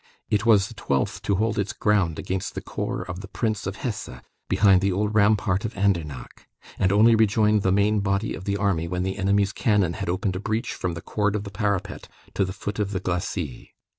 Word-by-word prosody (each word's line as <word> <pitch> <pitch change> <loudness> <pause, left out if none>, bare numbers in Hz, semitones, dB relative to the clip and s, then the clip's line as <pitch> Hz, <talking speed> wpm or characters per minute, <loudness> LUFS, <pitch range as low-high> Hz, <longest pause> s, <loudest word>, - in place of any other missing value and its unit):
It 105 +2 +1
was 100 -4 +5
the - - -11
twelfth 70 -1 -1
to 100 - 0
hold 110 +2 0
its 100 0 -1
ground 100 -7 +1
against 95 -1 -3
the - - -3
corps - - -4
of 90 0 -6
the 100 - -8
Prince 110 -1 -2
of 95 - -3
Hesse, 115 -4 -4 0.4
behind 100 -3 +5
the 100 0 +1
old 105 +3 -1
rampart 100 -2 +3
of 110 - -4
Andernach, 85 -10 -2 0.3
and 95 - +3
only 110 +3 +6
rejoined 110 -1 +3
the 95 - +1
main 100 +2 +3
body 100 +2 0
of 95 - -8
the 100 0 0
army 95 -5 0
when 90 +1 -2
the 95 +2 -3
enemy's 100 +1 +2
cannon 105 -8 +2
had - - -4
opened 95 +1 -1
a - - -2
breach 110 +4 -2
from 85 -2 -3
the 85 - -6
cord 105 -1 0
of 105 - -2
the 100 - -8
parapet 100 -1 -2 0.3
to 100 - +1
the 95 - -3
foot 100 +2 -5
of 100 -1 -1
the 95 - -1
glacis. 90 -6 -3
100 Hz, 220 wpm, -24 LUFS, 95-105 Hz, 0.4 s, only